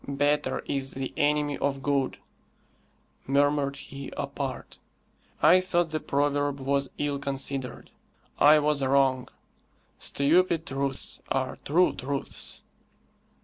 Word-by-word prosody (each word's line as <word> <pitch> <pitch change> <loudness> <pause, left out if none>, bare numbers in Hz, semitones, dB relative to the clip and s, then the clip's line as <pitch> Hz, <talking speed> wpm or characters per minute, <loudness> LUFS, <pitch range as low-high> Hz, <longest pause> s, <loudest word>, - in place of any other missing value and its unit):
"'Better' 145 +1 0
is 135 -1 -2
the 135 -1 -4
enemy 145 0 +1
of 135 -1 -1
'good,'" 140 -2 0 1.1
murmured 140 0 +2
he 140 0 -9
apart. - - -5 0.6
"I 175 +4 +7
thought 175 -3 +1
the 155 - -1
proverb 145 0 0
was 140 0 0
ill 145 -1 -1
considered. 135 -2 -3 0.5
I 150 +2 +7
was 150 -1 +1
wrong. 130 -1 +2 0.7
Stupid 165 +3 +2
truths 135 0 -3
are 130 -1 -1
true 175 +5 +3
truths." 140 +1 -4
140 Hz, 105 wpm, -27 LUFS, 135-150 Hz, 1.1 s, I